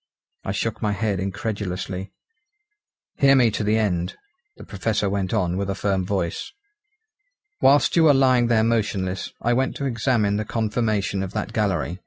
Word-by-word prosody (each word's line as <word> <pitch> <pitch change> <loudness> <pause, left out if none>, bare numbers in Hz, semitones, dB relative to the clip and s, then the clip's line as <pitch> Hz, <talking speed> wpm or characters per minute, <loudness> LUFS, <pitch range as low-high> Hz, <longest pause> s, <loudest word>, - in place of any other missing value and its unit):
I - - -3
shook 105 +2 -3
my 105 -2 0
head 100 -1 -1
incredulously. 95 -1 -4 1.1
"Hear 135 0 +5
me 120 -4 +4
to 105 - -2
the 105 +1 +2
end," 90 -5 -1 0.4
the - - -11
Professor 100 +1 -1
went 95 -2 -1
on 90 -5 0
with 100 0 -2
a 95 - -1
firm 95 -2 -1
voice. 95 -4 -2 1.1
"Whilst 145 +2 +4
you 165 -1 +5
were 150 - +7
lying 130 -3 +4
there 115 -2 +3
motionless, 100 -5 -1
I 120 - +2
went 130 +2 0
to 140 - -4
examine 115 -4 +1
the 110 - -1
conformation 110 -3 -1
of 95 0 -5
that 110 - -4
gallery. 95 -4 -1
105 Hz, 165 wpm, -23 LUFS, 95-115 Hz, 1.1 s, were